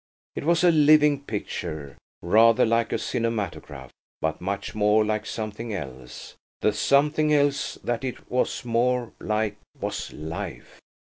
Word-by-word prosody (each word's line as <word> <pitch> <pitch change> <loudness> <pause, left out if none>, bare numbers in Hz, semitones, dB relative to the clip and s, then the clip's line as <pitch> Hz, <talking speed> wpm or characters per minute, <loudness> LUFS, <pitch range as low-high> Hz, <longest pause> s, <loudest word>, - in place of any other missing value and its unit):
It - - -4
was 170 +1 +3
a 175 - +6
living 150 -2 +5
picture–rather 100 - +1
like 115 0 +1
a - - +1
cinematograph, 115 -5 -3 0.3
but 80 -1 -2
much 100 +2 -3
more 105 0 +3
like 110 0 -2
something 110 0 -4
else. 65 -7 -8 0.3
The 105 - +2
something 150 +6 +2
else 145 -1 +2
that 120 +1 -2
it 130 -2 -5
was 125 0 -1
more 120 0 +1
like 105 -1 -1 0.2
was - - -4
life. 80 +2 -7
115 Hz, 130 wpm, -25 LUFS, 105-135 Hz, 0.3 s, a